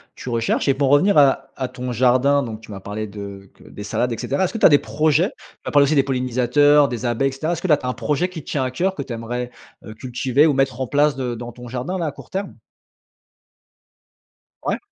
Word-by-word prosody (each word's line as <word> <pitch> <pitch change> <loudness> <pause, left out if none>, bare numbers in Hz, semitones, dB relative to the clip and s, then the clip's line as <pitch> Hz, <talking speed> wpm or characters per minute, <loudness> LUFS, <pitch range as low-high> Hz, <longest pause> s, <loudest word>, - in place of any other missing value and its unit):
tu - - -11
recherches 115 +2 0
et 135 - +4
pour 135 0 0
revenir 150 +8 +4
à 140 -2 +4
à 130 -1 -3
ton 125 -1 -5
jardin, 130 +4 +3
donc 110 -3 -6
tu 110 - -16
m'as 100 -2 -8
parlé 105 +2 -5
de 100 -1 -9
que - - -20
des 105 - -10
salades 125 +4 -1
et 115 - -3
cetera. 140 - -1
Est-ce 185 - 0
que - - -4
tu - - +3
as - - +12
des 145 - +6
projets? 155 +6 +1
Tu - - -18 0.2
m'as - - -3
parlé 145 -1 +5
aussi 150 +3 +1
des 140 - +4
pollinisateurs, 130 +3 +3
des 120 0 -4
abeilles, 120 +3 +1
et - - -7
cetera. 155 +6 -2
Est-ce 170 - -5
que, 185 - -3
là, 150 - +6
tu 130 - -9
as - - -1
un - - -1
projet 140 +9 -1
qui 175 -5 -9
te - - -12
tient 140 - 0
à 130 - -3
coeur, 185 +9 0
que 145 - -5
tu 130 - -7
aimerais, 120 +2 -4 0.3
heu, 110 - -8
cultiver 130 +5 +1
ou 150 - +2
mettre 135 -1 0
en 130 - -1
place 145 +2 +2
de 125 -2 -3
dans 120 +1 -8
ton 125 -1 -11
jardin, 130 +10 -3
là, 170 -3 -2
à - - -2
court - - -14
terme? 195 +1 -4 2.1
Ouais. - - -1
130 Hz, 260 wpm, -21 LUFS, 120-145 Hz, 2.1 s, as